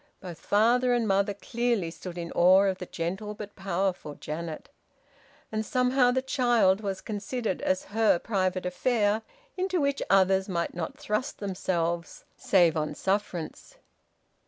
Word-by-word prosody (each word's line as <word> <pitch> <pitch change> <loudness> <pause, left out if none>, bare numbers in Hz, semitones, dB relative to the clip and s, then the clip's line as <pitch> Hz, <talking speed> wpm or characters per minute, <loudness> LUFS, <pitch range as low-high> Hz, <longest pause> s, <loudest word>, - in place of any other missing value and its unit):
Both 175 -4 -9
father 240 +7 +3
and 235 -2 0
mother 200 0 +1
clearly 230 -5 -1
stood 180 +1 -9
in 170 -1 -5
awe 185 +3 +6
of 190 -2 0
the 180 - -6
gentle 190 +5 -4
but 205 0 -9
powerful 190 -5 -2
Janet. 155 0 -6 0.8
And 215 0 -1
somehow 250 +2 +2
the 260 +1 +1
child 240 -7 +3
was 195 -2 -3
considered 215 0 -3
as 185 0 0
her 220 -4 +4
private 185 -2 -1
affair, 210 +3 +1 0.4
into 370 -1 0
which 280 -1 0
others 190 0 +3
might 170 -2 -2
not 280 - -5
thrust 260 -5 -2
themselves 175 -4 -2
save 175 -5 +3
on 150 -1 -2
sufferance. 195 - -3
195 Hz, 140 wpm, -27 LUFS, 180-230 Hz, 0.8 s, awe